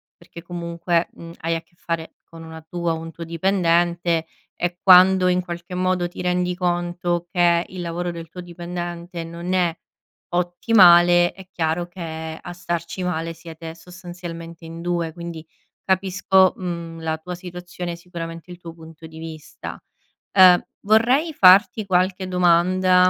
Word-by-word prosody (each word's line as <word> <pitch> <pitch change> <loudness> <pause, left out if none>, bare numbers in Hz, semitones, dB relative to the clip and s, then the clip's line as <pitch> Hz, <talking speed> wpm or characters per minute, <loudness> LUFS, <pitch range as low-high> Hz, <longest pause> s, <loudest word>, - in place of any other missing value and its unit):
perché 170 +1 -13
comunque, 170 0 -1
mhmm, 165 0 -11
hai 165 +1 -1
a 165 - -3
che - - -37
fare 165 -1 -4
con 165 0 -12
una 160 0 -10
tua 170 +1 -3
o - - -3
un 165 0 -7
tuo 170 - -8
dipendente, 170 -1 +1 0.3
e 175 0 -2
quando 185 0 +7
in 180 0 +2
qualche 175 +1 -8
modo 180 -1 0
ti 175 - -9
rendi 180 0 0
conto 175 -1 -1
che 175 -2 +3
il 185 -1 -7
lavoro 175 +1 -3
del 165 -1 -8
tuo 180 +3 -9
dipendente 175 0 -6
non 170 +2 -5
è 175 -3 +1 0.6
ottimale, 175 -1 +5
è 190 - -13
chiaro 165 +1 -1
che 160 -2 -7
a 175 - -8
starci 175 +1 -4
male 165 -2 -2
siete 165 0 -9
sostanzialmente 175 -1 -9
in 165 +1 -8
2; 170 -2 -1
quindi 170 -1 -8 0.4
capisco, 190 0 +3
mhmm, 170 -2 -6
la 160 -1 -2
tua 180 +3 -7
situazione, 175 -1 -7
sicuramente 170 0 -8
il 175 - -10
tuo 165 -1 -9
punto 160 0 -12
di 160 0 -13
vista. 160 -1 -9 0.5
Ehm, 185 -2 +8 0.2
vorrei 245 +10 +3
farti 200 +1 +6
qualche 185 0 +1
domanda, 180 +1 +4
175 Hz, 150 wpm, -22 LUFS, 165-180 Hz, 0.6 s, Ehm